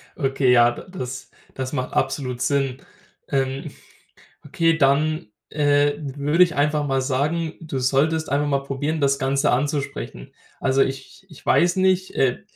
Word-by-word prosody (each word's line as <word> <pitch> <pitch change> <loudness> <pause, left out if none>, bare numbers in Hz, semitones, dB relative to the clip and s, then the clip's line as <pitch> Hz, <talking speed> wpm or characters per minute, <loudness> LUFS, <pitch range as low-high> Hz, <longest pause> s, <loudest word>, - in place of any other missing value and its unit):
Okay, 135 -3 +1
ja, 120 -1 +6
d - - -9 0.2
das 125 0 -6 0.2
das 130 +1 -5
macht 130 -3 -3
absolut 125 -3 -1
Sinn. 135 -2 0 0.5
Ähm, 135 -1 -2 0.7
okay, 165 +3 +1
dann, 155 -1 +2 0.2
äh, 145 -1 +3 0.2
würde 150 +5 +3
ich 170 - -4
einfach 150 0 +1
mal 135 -1 +1
sagen, 150 +5 -1
du 155 -5 -5
solltest 145 +5 +1
einfach 145 +1 +1
mal 140 -1 0
probieren, 145 +3 -2
das 140 -1 +2
Ganze 135 +2 +1
anzusprechen. 140 - -3 0.3
Also 135 +1 +3
ich 135 +8 -5
ich 160 -6 -15
weiß 175 +1 +3
nicht, 185 0 +2
äh, 130 -2 +1
140 Hz, 150 wpm, -22 LUFS, 135-155 Hz, 0.7 s, ja